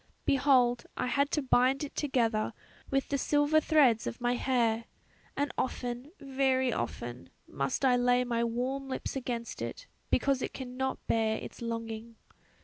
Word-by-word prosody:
Behold 255 -3 +3
I - - 0
had 280 +3 +1
to 300 - 0
bind 260 +2 +3
it 290 - -6
together 235 -7 0 0.4
with 270 0 0
the 280 - 0
silver 290 +2 +3
threads 275 -9 +4
of - - -5
my 240 0 +1
hair 235 -3 +1 0.5
and 285 -2 0
often, 250 +2 -3
very 265 -2 +1
often, 120 +1 -4 0.2
must 135 - -1
I 255 -1 +5
lay 245 0 +3
my 235 -1 0
warm 255 +4 -2
lips 260 - -4
against 240 -3 -4
it - - -5 0.2
because 275 -2 +2
it - - -4
cannot 260 0 -4
bear 220 -1 +1
its - - -9
longing." 230 0 -5
250 Hz, 150 wpm, -30 LUFS, 235-270 Hz, 0.5 s, I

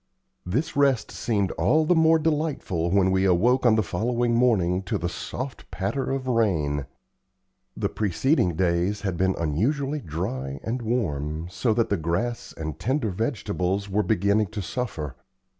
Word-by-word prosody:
This 125 - -1
rest 140 -4 +2
seemed 100 -5 0
all 155 +1 +3
the 180 - +4
more 160 -1 +5
delightful 150 - -1
when 95 0 +3
we 95 0 +2
awoke 120 +8 +3
on 110 - +5
the 110 - +2
following 120 +5 0
morning, 100 -7 +3
to - - -1
the 85 - -2
soft 125 +8 -6
patter 105 +8 -2
of 135 -1 -2
rain. 80 - +1 0.9
The - - 0
preceding 105 - +1
days 90 +4 +1
had 95 -4 -2
been 95 +2 +1
unusually 135 - 0
dry 70 - -4
and 120 +3 -2
warm, 80 - -2
so 115 +4 0
that 115 -1 +1
the 100 - +1
grass 85 +9 -2
and 80 -2 -5
tender 130 -4 0
vegetables 100 -3 -2
were 105 +2 +2
beginning 105 0 +2
to 105 +2 -5
suffer. 80 - -4
105 Hz, 155 wpm, -25 LUFS, 85-125 Hz, 0.9 s, more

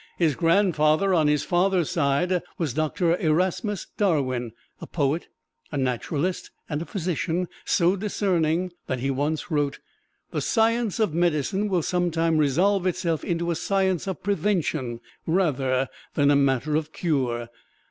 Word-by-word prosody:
His 165 -4 +3
grandfather 170 +1 +3
on 160 -4 +3
his 150 -1 +2
father's 180 -2 +1
side 170 +2 +1 0.2
was 155 -8 -1
Doctor 165 +3 +1
Erasmus 180 +5 0
Darwin, 130 - 0 0.3
a - - -8
poet, 150 +1 -1 0.4
a 145 - -3
naturalist, 140 +7 -1 0.2
and 150 -1 -3
a - - -4
physician 175 -1 -2 0.2
so 175 +2 +3
discerning 185 -4 0 0.2
that 130 - -1
he 135 +3 -1
once 145 +5 -2
wrote: 145 -2 0 0.5
"The - - -2
science 230 -2 +1
of 215 -8 +1
medicine 175 +4 +1
will 180 -4 +1
some 180 +1 0
time 165 -1 +1
resolve 180 +7 +2
itself 170 -3 -1
into 170 0 -1
a - - 0
science 190 0 0
of 190 - -4
prevention 160 - -1 0.3
rather 135 -7 +1 0.3
than 145 -1 +4
a - - +5
matter 140 +1 +2
of 155 0 -1
cure. 125 -9 -1
165 Hz, 145 wpm, -25 LUFS, 145-185 Hz, 0.5 s, a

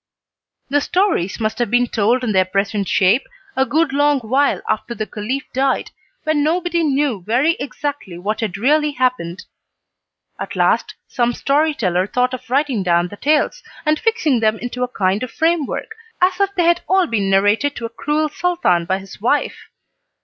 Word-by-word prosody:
The 290 0 +3
stories 355 - 0
must 220 +1 -2
have 240 - 0
been 245 +1 +3
told 235 +2 +1
in 230 - 0
their 190 -2 +4
present 195 +1 -1
shape 200 +7 +3 0.3
a 265 0 +2
good 295 +2 +1
long 290 0 +3
while 265 +5 +1
after 215 +2 -2
the 215 +1 -3
Caliph 230 +7 -4
died, 265 0 0 0.3
when 310 -2 +1
nobody 340 +2 0
knew 280 - 0
very 245 - +2
exactly 280 - -5
what 205 +5 -3
had 205 -4 -2
really 295 +6 +2
happened. 250 -10 -1 1.0
At - - -5
last - - +1
some 240 -1 0
storyteller 265 - +1
thought 250 +3 0
of 255 -1 -7
writing 270 -4 +1
down 175 -1 +1
the 205 - -9
tales, 305 - +1 0.2
and 305 0 +2
fixing 445 - +1
them 220 0 +2
into 245 +1 -6
a 250 - +1
kind 195 -3 0
of 255 - -4
framework, 325 - -1 0.3
as 365 +1 +2
if 395 0 +1
they 355 - +2
had 345 +1 +3
all 380 -1 +4
been 205 -9 -1
narrated 205 +9 +2
to 235 - -5
a - - -4
cruel 295 +6 -1
Sultan 305 - 0
by 190 +2 0
his 195 0 -12
wife. 270 +6 -1
255 Hz, 175 wpm, -19 LUFS, 210-300 Hz, 1.0 s, their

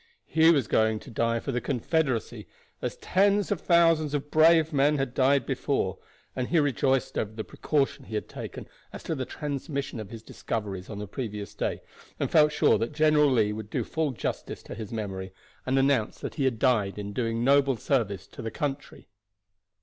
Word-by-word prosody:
He 160 +1 +4
was 140 -9 +3
going 110 0 +2
to 130 - -12
die 115 +1 0
for 135 - -4
the 125 -1 -1
Confederacy 135 -1 -1 0.3
as - - -3
tens 200 +2 +2
of 200 - -1
thousands 165 -3 +3
of 145 0 -4
brave 160 0 +5
men 145 +2 +3
had 135 -3 -2
died 135 0 +3
before, - - -1 0.4
and 125 -1 -2
he 170 - +1
rejoiced 135 -2 +1
over 110 0 -3
the 110 0 -5
precaution 140 0 -1
he 110 - -6
had 105 - -2
taken - - -8 0.2
as - - -9
to - - -2
the 130 -4 -3
transmission 140 -3 -4
of 105 -3 -7
his 115 -1 -9
discoveries 100 -5 -5
on 105 - -6
the 105 0 -5
previous 105 -3 -5
day, - - -3 0.4
and - - -1
felt 150 -1 +5
sure 130 - +3
that 115 +5 -2
General 150 -1 +4
Lee 110 -5 +2
would 105 -1 -7
do - - -1
full 160 -2 -1
justice 130 - -4
to - - -8
his 110 -2 -7
memory, 95 -4 -4 0.4
and 130 +1 +2
announce 135 -5 +2
that - - -6
he 140 - -1
had 125 -3 +1
died 110 -6 +2
in 100 0 -5
doing 115 0 -1
noble 140 -1 +4
service 105 -7 -1
to - - -11
the 110 - -3
country. 140 +3 -5
130 Hz, 195 wpm, -27 LUFS, 110-150 Hz, 0.4 s, brave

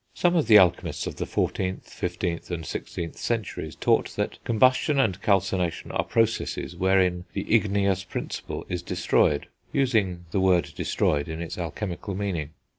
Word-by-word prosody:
Some 175 0 +2
of 160 - +2
the 110 -2 +9
alchemists 90 -4 +3
of - - -5
the - - -2
14th, 95 0 -1
15th 85 -1 -3
and 85 -2 -3
16th 85 +1 -5
centuries 115 -5 -3
taught - - +1
that - - -3
combustion 130 +5 +3
and 100 -7 +1
calcination 95 -4 0
are - - 0
processes 115 -5 0
wherein 90 -1 +2
the 100 - -3
igneous 100 -3 +2
principle 95 - -5
is 90 -1 -3
destroyed, 75 -3 +1 0.3
using 105 -10 +1
the 100 - +1
word 90 -4 +2
"destroyed" 75 -1 0
in 80 0 -5
its 85 -1 -5
alchemical 90 +3 -4
meaning. 90 -7 -2
95 Hz, 150 wpm, -26 LUFS, 85-105 Hz, 0.3 s, the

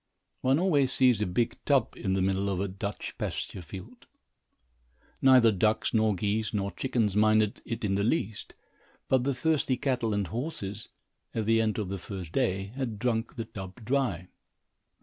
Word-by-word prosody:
One 130 +2 +3
always 150 -7 +3
sees 125 -5 +4
a 105 - +1
big 115 +6 -1
tub 140 -3 +2
in 95 -3 -2
the 95 -1 +1
middle 95 +1 +1
of 95 -2 -1
a 100 - 0
Dutch 100 +2 -5
pasture 95 - -4
field. 95 +8 -11 1.1
Neither 130 -4 +7
ducks, 110 +2 +1
nor 110 -2 +3
geese, 105 +3 -1
nor 100 -1 -1
chickens 115 -7 0
minded 110 0 +3
it 115 -1 -3
in 95 - +1
the 100 +1 +1
least, 110 -3 -1 0.5
but 130 -1 +2
the 140 -1 +1
thirsty 140 -2 +1
cattle 125 -4 0
and 100 -1 0
horses, 110 - -5 0.5
at 110 -2 0
the 115 +1 +4
end 110 -1 0
of 105 -4 -2
the 100 0 -4
first 95 -3 -7
day, 95 -4 0
had 125 -6 -3
drunk 115 0 -1
the 115 - -4
tub 95 +1 -9
dry. 115 -9 0
110 Hz, 170 wpm, -29 LUFS, 100-125 Hz, 1.1 s, Neither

